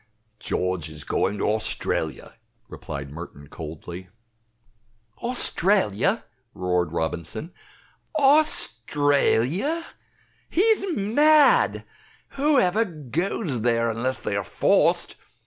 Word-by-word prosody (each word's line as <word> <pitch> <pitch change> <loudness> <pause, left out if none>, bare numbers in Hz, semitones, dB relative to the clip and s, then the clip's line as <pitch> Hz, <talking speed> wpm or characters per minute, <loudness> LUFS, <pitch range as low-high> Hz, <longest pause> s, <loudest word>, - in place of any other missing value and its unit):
"George 90 -3 -2
is 75 -1 -9
going 100 +2 -1
to - - -1
Australia," 110 +1 -2 0.3
replied 70 0 -7
Merton, 75 -2 -10
coldly. 85 +3 -8 1.1
"Australia!" 195 - +1 0.3
roared 90 -3 0
Robinson 85 - -4 0.6
"Australia! 180 - +2 0.6
He's 410 +2 +2
mad. 300 - +4 0.4
Who 290 +1 +1
ever 210 +1 +2
goes 155 - -3
there 115 0 +1
unless 125 +4 -2
they - - -2
are - - -1
forced? - - +1
135 Hz, 85 wpm, -24 LUFS, -, 1.1 s, mad